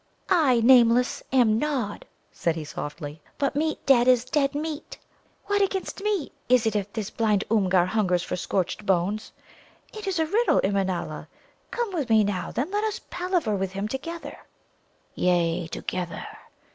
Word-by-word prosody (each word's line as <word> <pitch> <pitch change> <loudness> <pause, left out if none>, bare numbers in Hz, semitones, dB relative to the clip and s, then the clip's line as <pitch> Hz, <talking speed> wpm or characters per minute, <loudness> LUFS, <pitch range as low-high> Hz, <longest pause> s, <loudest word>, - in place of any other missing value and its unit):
"I, 290 -10 +4
Nameless, 245 0 +5
am 235 -4 +4
Nod," 260 -8 -2 0.2
said 165 -1 -1
he 160 - -4
softly. 150 0 -7 0.2
"But 280 0 0
meat 310 +2 -1
dead 250 -3 +5
is 250 -1 +4
dead 275 +2 0
meat. 305 +1 -5 0.5
What 405 0 +1
against 390 0 -1
me 405 -7 -1 0.2
is 250 -2 +4
it 220 -1 0
if 205 -1 -1
this 210 -1 -4
blind 215 -3 +1
Oomgar 190 -5 +3
hungers 185 -3 +1
for - - -3
scorched 185 +3 -2
bones? 195 +3 0 0.6
It 430 -2 -7
is 380 -2 0
a 320 - +2
riddle, 435 +9 +2
Immanâla. 190 -5 -1 0.4
Come 470 -4 -3
with 295 -8 -2
me 220 -1 +5
now, 195 -3 -2
then; 275 +10 -2
let 415 +1 0
us 435 -1 -1
palaver 355 - 0
with 190 -1 -2
him 195 +2 -2
together." 325 +8 -6 0.8
"Yea, 175 -1 +1
together!" 175 +1 -4
230 Hz, 160 wpm, -25 LUFS, 190-310 Hz, 0.8 s, Nameless